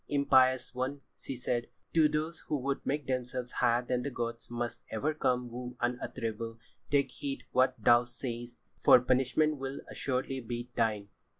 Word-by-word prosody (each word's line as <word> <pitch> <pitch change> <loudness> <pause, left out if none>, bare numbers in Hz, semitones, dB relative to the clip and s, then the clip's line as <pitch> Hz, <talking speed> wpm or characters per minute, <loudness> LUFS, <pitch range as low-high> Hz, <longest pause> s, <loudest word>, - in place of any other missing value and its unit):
"Impious 130 -3 +4
one!" 130 +3 -2 0.2
she 135 - -5
said, 120 -1 -1 0.3
"to 160 -2 +5
those 155 +2 -2
who 150 - 0
would 135 +1 -2
make 145 +1 -1
themselves 125 -1 -2
higher 120 0 +2
than 125 0 0
the 140 - -2
gods 115 -2 -4
must 120 0 -3
ever 140 +8 0
come 125 -5 0
woe 125 +1 -6
unutterable. 115 -2 -3 0.3
Take 140 -1 +2
heed 140 -1 -5
what 130 0 +3
thou 120 +1 +5
sayest, 120 0 -6 0.2
for - - +8
punishment 130 +5 +2
will 135 0 -5
assuredly 130 0 -2
be 120 0 -5
thine." 105 -3 0
125 Hz, 160 wpm, -31 LUFS, 120-135 Hz, 0.3 s, for